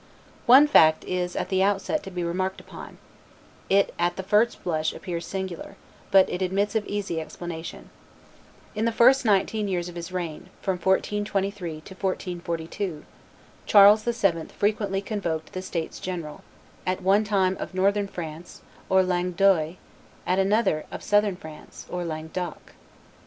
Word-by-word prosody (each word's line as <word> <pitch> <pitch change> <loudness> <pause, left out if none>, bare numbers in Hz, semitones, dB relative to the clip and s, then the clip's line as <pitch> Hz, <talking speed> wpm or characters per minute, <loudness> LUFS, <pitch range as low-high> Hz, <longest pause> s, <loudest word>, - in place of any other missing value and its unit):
One 265 +5 +9
fact 160 - +5
is 180 -1 -2
at - - -2
the 190 -1 +1
outset 200 +9 +1
to - - -8
be 180 -2 -4
remarked 185 +3 -2
upon; - - -11 0.7
it 195 +1 +3
at 175 0 +1
the 190 - -5
first 210 +4 +2
blush 160 -3 -1
appears 170 -2 -5
singular, 190 0 -5 0.3
but 195 -1 +6
it 180 - -4
admits 195 +3 0
of 220 -2 -1
easy 195 -5 -2
explanation. 165 0 -8 0.8
In 215 +1 -1
the 230 - +2
first 255 +3 +5
nineteen 210 0 +2
years 180 -2 -2
of 175 - -11
his 170 +1 -6
reign, 175 -4 -5
from 190 -2 -2
1423 195 -2 -1
to 190 - -12
1442, 175 -2 -4 0.6
Charles 205 +1 +8
VII. 240 - +2
very 170 -5 +2
frequently 205 -2 -1
convoked 175 -7 -3
the 185 - -4
states 170 -3 -4
general, 170 -5 -5 0.4
at 185 0 -2
one 195 +3 +4
time 195 -3 +1
of - - -6
Northern 200 +2 +2
France, 165 -2 -8 0.3
or 190 0 +5
Langue 180 0 -1
d'oil, 175 -3 +3 0.5
at 185 +2 +1
another 195 -5 +2
of - - -7
Southern 205 -2 +2
France, 155 -4 -11
or 180 0 -3
Langue 160 -1 -5
d'oc. 180 -1 -6
185 Hz, 155 wpm, -25 LUFS, 170-200 Hz, 0.8 s, One